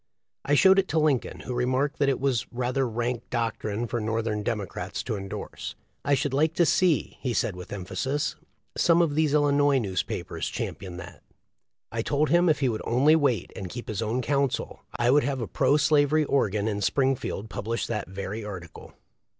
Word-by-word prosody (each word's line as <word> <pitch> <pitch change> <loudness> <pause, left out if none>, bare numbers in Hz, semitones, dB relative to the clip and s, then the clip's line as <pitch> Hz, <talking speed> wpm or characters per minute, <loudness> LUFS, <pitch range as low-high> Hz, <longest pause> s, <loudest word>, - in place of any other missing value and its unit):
I 145 - +2
showed 190 +5 +6
it 190 - +1
to 160 - -1
Lincoln, 150 -5 0
who 125 - -5
remarked 130 +4 0
that 140 -1 +3
it 135 - 0
was 130 -4 0
"rather 125 +1 -1
rank 120 +1 -3
doctrine 115 -2 -2
for 120 0 -2
Northern 110 -1 -1
Democrats 105 -3 -3
to - - -2
endorse. 95 -1 -6 0.3
I 140 0 +3
should 135 0 -1
like 155 +4 +2
to 175 - +4
see," 175 -1 +2
he 125 -4 -1
said, 100 - 0
with 90 0 -9
emphasis, 135 +10 -2 0.4
"some 170 0 +4
of 155 -4 0
these 155 -1 +2
Illinois 145 -1 +4
newspapers 95 -7 -3
champion 90 -1 -5
that." 90 0 -10 0.7
I 115 - -1
told 145 +5 +1
him 175 +1 +5
if 155 - +2
he 130 - +3
would 110 -2 -3
only 140 +6 +4
wait 135 - +1
and 95 -2 -6
keep 120 +4 -7
his 110 0 -3
own 115 +3 -1
counsel 140 0 -1 0.2
I 120 +1 +3
would 145 +2 +5
have 135 +1 -1
a 115 - -2
pro 145 - +2
slavery 150 0 +3
organ 105 -7 +1
in 105 -2 -2
Spring 135 +5 +2
field 110 -3 -5
publish 115 +3 -2
that 110 -2 -3
very 100 +3 -5
article. 90 -5 -9
125 Hz, 190 wpm, -26 LUFS, 110-145 Hz, 0.7 s, showed